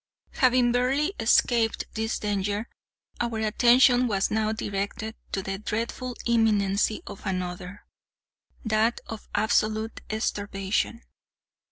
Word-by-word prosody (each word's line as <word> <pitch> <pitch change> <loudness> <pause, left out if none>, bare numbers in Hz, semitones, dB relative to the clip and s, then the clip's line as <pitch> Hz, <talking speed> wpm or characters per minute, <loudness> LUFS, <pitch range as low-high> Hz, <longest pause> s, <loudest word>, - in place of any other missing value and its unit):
Having 250 -2 +3
barely 270 +8 +1
escaped 225 0 +3
this 220 0 -1
danger, 205 +1 -2 0.5
our 235 -2 -1
attention 245 +3 +4
was 195 -3 0
now 215 0 +1
directed 205 +1 -3 0.2
to 195 - -2
the 195 0 -4
dreadful 235 +4 -3
imminency 215 -3 +2
of 200 - -9
another—that 195 +4 -4
of 225 -1 -8
absolute 220 0 +1 0.2
starvation. 205 +1 -2
220 Hz, 95 wpm, -26 LUFS, 205-235 Hz, 0.5 s, attention